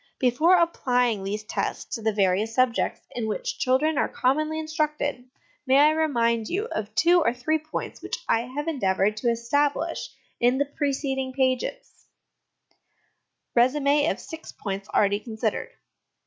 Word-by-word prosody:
Before 275 Hz, +9 st, +4 dB
applying 250 Hz, -, +1 dB
these 210 Hz, +2 st, -3 dB
tests 215 Hz, -, -4 dB
to 230 Hz, -, -3 dB
the 220 Hz, 0 st, +1 dB
various 205 Hz, +2 st, +1 dB
subjects 255 Hz, -2 st, +1 dB
in 230 Hz, -2 st, -3 dB
which 215 Hz, -, -3 dB
children 275 Hz, +4 st, +2 dB
are -, -, +1 dB
commonly 305 Hz, +5 st, 0 dB
instructed, 300 Hz, -4 st, -2 dB, 0.4 s
may 260 Hz, -, +4 dB
1 300 Hz, +2 st, +6 dB
remind 235 Hz, -8 st, +1 dB
you 400 Hz, +5 st, -1 dB
of 215 Hz, 0 st, -4 dB
two 345 Hz, +8 st, +5 dB
or 240 Hz, -5 st, +1 dB
three 310 Hz, +6 st, 0 dB
points 310 Hz, +1 st, -6 dB
which -, -, -4 dB
I 230 Hz, +2 st, +1 dB
have 295 Hz, +2 st, -3 dB
endeavoured 205 Hz, -8 st, +1 dB
to 240 Hz, +2 st, 0 dB
establish 285 Hz, +7 st, 0 dB, 0.3 s
in 245 Hz, +2 st, +3 dB
the 285 Hz, -, +2 dB
preceding 270 Hz, -2 st, -2 dB
pages: 260 Hz, -, -2 dB, 1.5 s
Resume 280 Hz, +4 st, +3 dB
of -, -, -2 dB
Six 320 Hz, -1 st, -9 dB
Points 195 Hz, 0 st, -5 dB
already 205 Hz, 0 st, +2 dB
considered. 220 Hz, -1 st, -3 dB
255 Hz, 145 wpm, -25 LUFS, 225-300 Hz, 1.5 s, 1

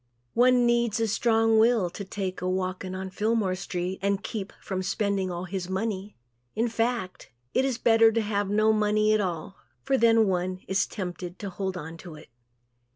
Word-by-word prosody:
One 250 Hz, 0 st, +4 dB
needs 235 Hz, -1 st, +2 dB
a 225 Hz, -, +1 dB
strong 225 Hz, 0 st, +3 dB
will 220 Hz, -6 st, +3 dB
to 200 Hz, -, -6 dB
take 190 Hz, -1 st, -4 dB
a 180 Hz, -, -1 dB
walking 185 Hz, 0 st, -2 dB
on 190 Hz, 0 st, -5 dB
Fillmore 215 Hz, -1 st, 0 dB
street 180 Hz, 0 st, -4 dB
and 200 Hz, 0 st, 0 dB
keep 205 Hz, -3 st, -5 dB
from 190 Hz, -1 st, -4 dB
spending 200 Hz, -1 st, -1 dB
all 175 Hz, 0 st, -4 dB
his 185 Hz, -1 st, -4 dB
money. 200 Hz, +1 st, -3 dB, 0.4 s
In 230 Hz, +2 st, +1 dB
fact 225 Hz, -4 st, -2 dB, 0.2 s
it 260 Hz, -, +2 dB
is 260 Hz, -3 st, -1 dB
better 225 Hz, -1 st, +5 dB
to 230 Hz, -, +2 dB
have 205 Hz, -2 st, -1 dB
no 215 Hz, +1 st, +3 dB
money 215 Hz, 0 st, +2 dB
at 215 Hz, -, +3 dB
all 180 Hz, 0 st, -4 dB, 0.3 s
for 270 Hz, -, +1 dB
then 225 Hz, -1 st, +5 dB
one 185 Hz, 0 st, -1 dB
is 190 Hz, +1 st, +1 dB
tempted 180 Hz, -2 st, -6 dB
to 200 Hz, -2 st, -6 dB
hold 190 Hz, 0 st, -3 dB
on 165 Hz, 0 st, -7 dB
to 165 Hz, -2 st, -10 dB
it. 150 Hz, -, -14 dB
200 Hz, 185 wpm, -27 LUFS, 185-225 Hz, 0.4 s, better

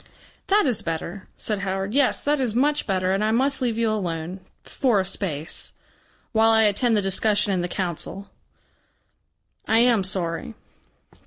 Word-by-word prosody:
"That 410 Hz, -1 st, +4 dB
is 250 Hz, -6 st, +1 dB
better," 170 Hz, +3 st, -5 dB
said 215 Hz, -2 st, -2 dB
Howard. 195 Hz, +1 st, -3 dB
"Yes, 280 Hz, -1 st, +2 dB
that 290 Hz, -1 st, +1 dB
is 235 Hz, -4 st, -1 dB
much 290 Hz, +3 st, +1 dB
better. 185 Hz, -2 st, 0 dB
And 195 Hz, +2 st, 0 dB
I 215 Hz, -, +1 dB
must 265 Hz, +5 st, +1 dB
leave 235 Hz, -3 st, 0 dB
you 230 Hz, -1 st, +1 dB
alone. 175 Hz, -3 st, -3 dB, 0.2 s
For 245 Hz, -7 st, +1 dB
a 190 Hz, -, 0 dB
space. 170 Hz, -5 st, -4 dB, 0.6 s
While 225 Hz, -1 st, +4 dB
I 220 Hz, 0 st, +5 dB
attend 220 Hz, +2 st, +3 dB
the 205 Hz, -, +1 dB
discussion 205 Hz, +1 st, +1 dB
in 180 Hz, -, 0 dB
the 175 Hz, -, -2 dB
Council.... 185 Hz, +2 st, -5 dB, 1.4 s
I 220 Hz, -, +3 dB
am 235 Hz, -3 st, +4 dB
sorry." 185 Hz, +3 st, -3 dB
210 Hz, 160 wpm, -24 LUFS, 185-235 Hz, 1.4 s, I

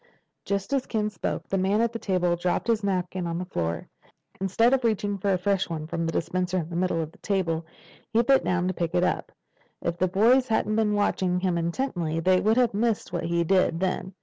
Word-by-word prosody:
Just 200 Hz, +6 st, -2 dB
as 270 Hz, -2 st, 0 dB
Ken 215 Hz, -2 st, -1 dB
spoke, 190 Hz, -, -4 dB
the 195 Hz, -, 0 dB
man 195 Hz, +3 st, +2 dB
at 235 Hz, 0 st, +1 dB
the 230 Hz, -, -4 dB
table 180 Hz, -4 st, +1 dB
dropped 175 Hz, +1 st, -1 dB
his 225 Hz, -2 st, +1 dB
napkin 185 Hz, -2 st, -1 dB
on 165 Hz, 0 st, -2 dB
the 180 Hz, -, -3 dB
floor. 85 Hz, -, -3 dB, 0.5 s
Instead 210 Hz, +6 st, +3 dB
of 265 Hz, -1 st, +2 dB
reaching 205 Hz, -3 st, 0 dB
for 200 Hz, +1 st, +1 dB
a 185 Hz, -, +3 dB
fresh 190 Hz, +1 st, 0 dB
one 155 Hz, -2 st, -4 dB
from 165 Hz, +1 st, -2 dB
the -, -, -1 dB
dispenser 185 Hz, +2 st, -1 dB
in 170 Hz, -1 st, -3 dB
the -, -, -4 dB
middle 180 Hz, -1 st, 0 dB
of 155 Hz, -, -8 dB
the -, -, -22 dB
table, 170 Hz, -5 st, -1 dB, 0.4 s
he 230 Hz, +1 st, +3 dB
bent 270 Hz, +2 st, +4 dB
down 180 Hz, 0 st, 0 dB
to 185 Hz, -, 0 dB
pick 170 Hz, 0 st, -2 dB
it 175 Hz, -, +3 dB
up. -, -, -1 dB, 0.5 s
If 170 Hz, 0 st, -3 dB
the 185 Hz, -, +3 dB
boys 235 Hz, +8 st, +4 dB
hadn't 215 Hz, -1 st, +1 dB
been 215 Hz, -1 st, +2 dB
watching 185 Hz, -3 st, +1 dB
him 180 Hz, -1 st, 0 dB
intently 170 Hz, -, -1 dB
they 185 Hz, +2 st, +3 dB
would 220 Hz, +3 st, +2 dB
have 245 Hz, -4 st, +3 dB
missed 215 Hz, -3 st, -1 dB
what 175 Hz, -, -2 dB
he 170 Hz, 0 st, +1 dB
did 185 Hz, -1 st, +2 dB
then. 185 Hz, 0 st, -2 dB
185 Hz, 230 wpm, -26 LUFS, 175-210 Hz, 0.5 s, bent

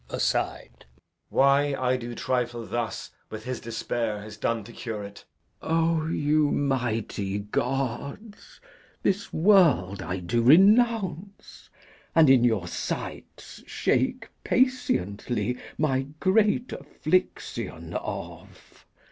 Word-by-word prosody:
Edg. -, -, -4 dB
[aside]. -, -, -2 dB, 0.4 s
Why 140 Hz, +1 st, +3 dB
I 130 Hz, -1 st, +1 dB
do 120 Hz, -1 st, -5 dB
trifle 120 Hz, -2 st, -2 dB
thus 120 Hz, 0 st, -4 dB, 0.2 s
with 110 Hz, 0 st, -7 dB
his 130 Hz, +1 st, -4 dB
despair 115 Hz, -2 st, -3 dB
Is 105 Hz, 0 st, -9 dB
done 115 Hz, +1 st, -1 dB
to 120 Hz, -, -12 dB
cure 110 Hz, -4 st, -5 dB
it. 100 Hz, 0 st, -11 dB, 0.4 s
Glou. 165 Hz, 0 st, +1 dB
O -, -, -3 dB
you 150 Hz, -1 st, +2 dB
mighty 115 Hz, -8 st, -1 dB
gods! 125 Hz, -, -2 dB
He -, -, -12 dB
kneels. 205 Hz, -, -18 dB, 0.4 s
This 200 Hz, +1 st, 0 dB
world 160 Hz, -, +4 dB
I 90 Hz, -, -3 dB
do 105 Hz, +7 st, -1 dB
renounce, 200 Hz, -, +3 dB, 0.5 s
and, 160 Hz, -4 st, +7 dB
in 130 Hz, -3 st, +5 dB
your 110 Hz, -7 st, +1 dB
sights, -, -, -6 dB
Shake -, -, 0 dB
patiently 125 Hz, -, 0 dB, 0.2 s
my 135 Hz, -3 st, 0 dB
great 215 Hz, +5 st, +2 dB
affliction 370 Hz, -, -2 dB
off. -, -, -8 dB
130 Hz, 115 wpm, -26 LUFS, 115-165 Hz, 0.5 s, and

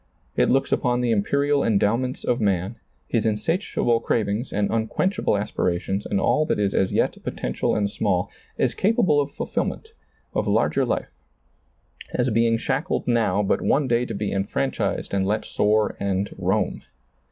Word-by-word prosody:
It -, -, +3 dB
looks 135 Hz, +1 st, +2 dB
upon 125 Hz, -1 st, +1 dB
the 120 Hz, -1 st, +1 dB
imperial 140 Hz, +7 st, +2 dB
endow 105 Hz, 0 st, +3 dB
ments 130 Hz, +1 st, -3 dB
of 120 Hz, -1 st, 0 dB
man, 100 Hz, +1 st, 0 dB, 0.3 s
his 115 Hz, -3 st, 0 dB
insatiable 115 Hz, -, 0 dB
cravings 110 Hz, +1 st, -1 dB
and 100 Hz, 0 st, 0 dB
un 110 Hz, -1 st, 0 dB
quenchable 185 Hz, -, 0 dB
aspirations 95 Hz, 0 st, -1 dB
and -, -, 0 dB
all 150 Hz, -, +2 dB
that -, -, +1 dB
is 100 Hz, -1 st, 0 dB
as 95 Hz, -, +1 dB
yet -, -, 0 dB
potential -, -, -2 dB
and 105 Hz, -1 st, +1 dB
small, 100 Hz, -, -1 dB, 0.3 s
as -, -, +1 dB
capable 185 Hz, -8 st, +3 dB
of 140 Hz, -, -3 dB
fulfillment, 445 Hz, -, -3 dB, 0.4 s
of -, -, -1 dB
lai^er -, -, +2 dB
life, -, -, -2 dB, 1.0 s
as 125 Hz, 0 st, +1 dB
being 115 Hz, +1 st, +3 dB
shackled -, -, -2 dB
now, 115 Hz, -4 st, +2 dB
but 100 Hz, -, +1 dB
one 140 Hz, -1 st, +2 dB
day 120 Hz, 0 st, +1 dB
to -, -, -5 dB
be 100 Hz, 0 st, -2 dB
enfranchised 100 Hz, +1 st, -2 dB
and 95 Hz, -1 st, +1 dB
let 110 Hz, +2 st, 0 dB
soar 105 Hz, +1 st, +1 dB
and 100 Hz, 0 st, -1 dB
roam. 95 Hz, +1 st, -1 dB
110 Hz, 165 wpm, -24 LUFS, 100-125 Hz, 1.0 s, It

